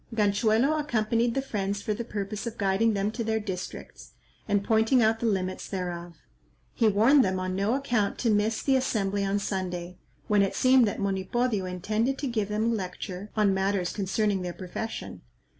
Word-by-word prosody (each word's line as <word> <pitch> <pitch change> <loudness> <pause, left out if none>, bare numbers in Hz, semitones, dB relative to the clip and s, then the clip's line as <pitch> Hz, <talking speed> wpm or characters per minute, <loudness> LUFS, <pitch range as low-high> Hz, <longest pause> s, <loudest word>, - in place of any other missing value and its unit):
Ganchuelo 220 +7 +2
accompanied 230 -3 0
the 270 - 0
friends 205 -5 -3
for 215 - 0
the 235 - -4
purpose 210 0 -4
of 230 - -6
guiding 205 +3 +2
them 200 +1 0
to 230 +1 -3
their 220 0 0
districts, 190 -4 -7 0.3
and 205 -1 +1
pointing 225 +3 +3
out 220 +1 +2
the 235 - 0
limits 185 -3 -2
thereof. 175 -3 -4 0.6
He 225 - +2
warned 230 +7 +5
them 185 -1 0
on 185 0 -2
no 200 +5 +1
account 240 -7 0
to 230 - +1
miss 210 +2 +1
the 270 - +3
assembly 205 -6 0
on 195 +1 0
Sunday, 180 -3 -4 0.3
when 210 -1 +4
it 195 - 0
seemed 255 -2 +5
that 205 - -3
Monipodio 200 +2 0
intended 215 +8 -1
to 285 - -3
give 215 -5 -1
them 210 +1 0
a 230 +1 +2
lecture 185 0 -5
on 205 -2 +4
matters 190 -2 0
concerning 200 0 0
their 180 -1 -4
profession. 190 +5 -6
210 Hz, 180 wpm, -27 LUFS, 195-225 Hz, 0.6 s, warned